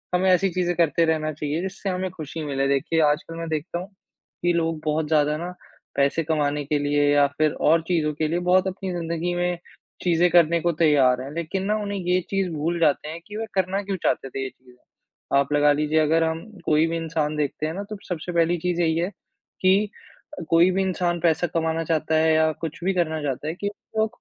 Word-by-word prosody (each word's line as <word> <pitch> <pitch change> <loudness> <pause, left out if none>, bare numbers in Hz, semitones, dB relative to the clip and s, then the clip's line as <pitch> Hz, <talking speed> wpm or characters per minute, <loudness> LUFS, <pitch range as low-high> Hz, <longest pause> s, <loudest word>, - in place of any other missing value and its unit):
हमें 185 +1 +2
ऐसी 185 +2 +3
चीज़ें 175 0 -1
करते 165 0 +3
रहना 155 -1 0
चाहिए 150 +2 -3
जिससे 190 +1 -4
हमें 185 0 -2
खुशी 160 -2 -7
मिले। 135 -1 0
देखिए, 140 +4 +1
आजकल 150 +2 +1
मैं 165 - -4
देखता 160 +3 -3
हूँ 185 - -7 0.6
कि 175 0 +3
लोग 165 -1 0
बहुत 155 0 0
ज़्यादा 150 -1 +2
ना 175 +2 -5 0.4
पैसे 140 +4 +2
कमाने 150 -2 0
के 150 +1 0
लिए 145 0 +2
या 145 0 +5
फिर 155 -1 +3 0.2
और 165 +1 +5
चीज़ों 160 -4 +1
के 155 +1 -1
लिए 170 +3 0
बहुत 180 +1 +3
अपनी 190 0 -4
ज़िंदगी 170 0 -2
में 175 0 0 0.5
चीज़ें 175 0 +3
करने 170 -1 +5
को 170 +1 +2
तैयार 130 -5 +4
हैं। 135 +2 -7
लेकिन 170 +4 -3
ना, 210 - +1
उन्हें 200 -1 -3
ये 180 0 +1
चीज़ 195 -2 0
भूल 165 +3 -1
जाते 150 -1 +2
हैं 165 - -6
कि 210 +1 -7
वे 225 - -3
करना 190 +1 0
क्यों 195 0 -3
चाहते 135 - 0
थे 135 0 -4
ये 130 - -3
चीज़। 125 -1 -22 0.6
आप 140 +1 +1
लगा 145 0 +5
लीजिए, 150 +2 +1
अगर 160 +2 +3
हम 160 0 -2 0.2
कोई 155 +1 +3
भी 165 - -2
इंसान 160 -2 -2
देखते 150 +1 -2
हैं 160 - -4
ना, 195 +3 -4
तो 210 +1 -7
सबसे 175 0 -4
पहली 170 +1 +2
चीज़ 175 0 -1
यही 160 -1 +2
है 175 +3 0 0.5
कि 195 +3 +3 0.5
अ, 175 - -5
कोई 165 +2 +5
भी 190 +1 0
इंसान 175 -2 -1
पैसा 170 +1 +2
कमाना 165 0 0
चाहता 160 -1 0
है 160 0 +4
या 160 0 +3
कुछ 160 -2 -5
भी 190 +2 +1
करना 160 -3 0
चाहता 140 +1 -3
है 160 - -1
कि 205 +3 -3 0.3
वो 220 0 +3
165 Hz, 220 wpm, -24 LUFS, 150-180 Hz, 0.6 s, या